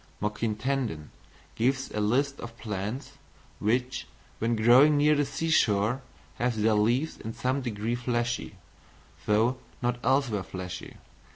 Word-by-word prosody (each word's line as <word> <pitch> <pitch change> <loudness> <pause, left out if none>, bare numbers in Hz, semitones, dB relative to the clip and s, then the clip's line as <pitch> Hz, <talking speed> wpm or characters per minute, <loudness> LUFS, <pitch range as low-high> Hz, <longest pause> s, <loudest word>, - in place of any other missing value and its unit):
Moquin 105 +1 -1
Tandon 115 - -2 0.4
gives 130 +3 0
a 105 - -2
list 140 +7 +1
of 115 0 -8
plants 120 +7 -5 0.4
which, 125 +4 0 0.3
when 115 +1 +1
growing 125 +7 +6
near 150 +1 +5
the 145 -1 +1
sea 165 0 -2
shore, 110 -1 +3 0.4
have 120 -2 0
their 110 +1 +3
leaves 120 +9 +1
in 110 0 -6
some 130 +2 0
degree 115 -2 -2
fleshy, 120 -1 -2 0.7
though 110 +5 +3 0.2
not 120 0 -1
elsewhere 130 -6 +2
fleshy. 95 -1 -7
120 Hz, 130 wpm, -28 LUFS, 105-130 Hz, 0.7 s, growing